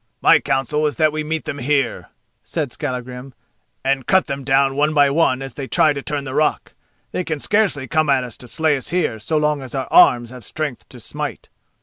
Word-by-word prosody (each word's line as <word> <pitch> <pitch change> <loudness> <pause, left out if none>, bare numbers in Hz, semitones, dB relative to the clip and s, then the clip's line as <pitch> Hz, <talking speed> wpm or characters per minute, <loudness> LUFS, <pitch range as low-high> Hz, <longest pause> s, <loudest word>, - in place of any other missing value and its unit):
"My - - +6
counsel 150 +3 0
is 145 - -3
that 155 +4 +3
we 155 0 -3
meet 160 +1 -3
them 145 - -5
here," 135 -1 -1 0.3
said 150 -6 -3
Skallagrim, 125 -2 -6 0.5
"and 135 -1 0
cut 190 0 +4
them 140 -2 -5
down 135 0 +2
one 150 +2 +1
by 145 -1 +5
one 135 -4 +2
as 135 -2 -8
they 135 +1 -6
try 160 -1 +3
to 140 - -5
turn 145 0 -3
the 130 -1 -6
rock. 150 +2 0 0.4
They 180 - -2
can 160 -3 -3
scarcely 190 -6 +1
come 155 -1 +1
at 135 -2 +3
us 120 -2 -8
to 125 - -12
slay 155 +5 +1
us 130 - -6
here 160 -10 -1
so 155 +9 -1
long 150 -1 +1
as 130 0 -8
our 130 -1 -2
arms 120 -1 +5
have 125 -2 -11
strength 150 +1 -5
to 125 - -12
smite." 140 +3 -6
140 Hz, 220 wpm, -20 LUFS, 130-155 Hz, 0.5 s, My